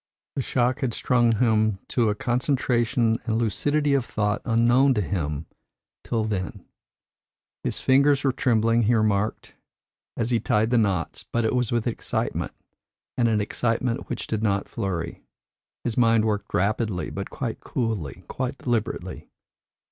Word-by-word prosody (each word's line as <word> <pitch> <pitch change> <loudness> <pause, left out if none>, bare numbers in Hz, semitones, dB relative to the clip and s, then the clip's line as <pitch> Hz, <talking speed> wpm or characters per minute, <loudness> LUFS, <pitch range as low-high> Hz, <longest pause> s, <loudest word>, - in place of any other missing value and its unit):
The 135 - 0
shock 130 +1 +1
had 125 -5 -1
strung 120 -2 +3
him 110 -2 +2
to 115 -3 +2
a 105 - 0
concentration 120 -2 +1
and 110 -1 +1
lucidity 145 +6 +1
of 135 -2 +2
thought 105 -1 -1
unknown 120 +3 +4
to 105 - +1
him 80 -6 -2 0.6
till 115 -2 -1
then. 100 -4 -3 1.0
His - - -2
fingers 140 +1 +4
were 135 - +3
trembling, 115 -2 +2
he 115 +2 +3
remarked, 105 -1 0 0.6
as 115 +1 -1
he 120 - +3
tied 110 +2 +1
the 120 - +4
knots, 95 -6 -1
but 115 -1 +1
it 110 - +1
was 125 -3 +1
with 120 -2 0
excitement, 120 - -2 0.6
and 120 - +2
an 110 -2 +2
excitement 115 +4 -1
which 120 - -3
did 110 -1 -2
not 100 -2 0
flurry. 90 -4 -4 0.6
His 120 - -2
mind 115 -2 +4
worked 105 -2 -1
rapidly, 105 -1 0
but 100 0 -5
quite 120 -5 -4
coolly, 110 - -3
quite 130 -1 -3
deliberately. 120 -4 -3
115 Hz, 150 wpm, -25 LUFS, 105-125 Hz, 1.0 s, unknown